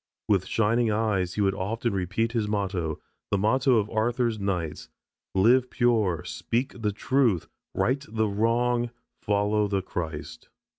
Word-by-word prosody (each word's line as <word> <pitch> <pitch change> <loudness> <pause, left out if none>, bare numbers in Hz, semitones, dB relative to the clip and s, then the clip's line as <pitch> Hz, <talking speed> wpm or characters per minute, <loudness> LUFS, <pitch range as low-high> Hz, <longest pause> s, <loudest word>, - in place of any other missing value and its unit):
With 95 -3 +2
shining 115 +1 +2
eyes 105 -4 0
he 105 - 0
would 95 -1 +2
often 115 +4 -2
repeat 95 +5 -1
his 115 -3 0
motto, 95 -7 -2 0.3
the 100 - +1
motto 130 +6 +3
of 105 -1 +1
Arthur's 115 0 0
knights: 85 -10 -3 0.5
"Live 120 +6 +4
pure, 110 -10 +1
speak 120 +1 -3
the 105 -1 +1
truth, 115 - +1 0.3
right 135 +3 +1
the 110 0 0
wrong, 120 +3 +1 0.3
follow 105 +1 +1
the 100 -2 -1
Christ." 80 -5 -6
105 Hz, 140 wpm, -26 LUFS, 95-120 Hz, 0.5 s, Live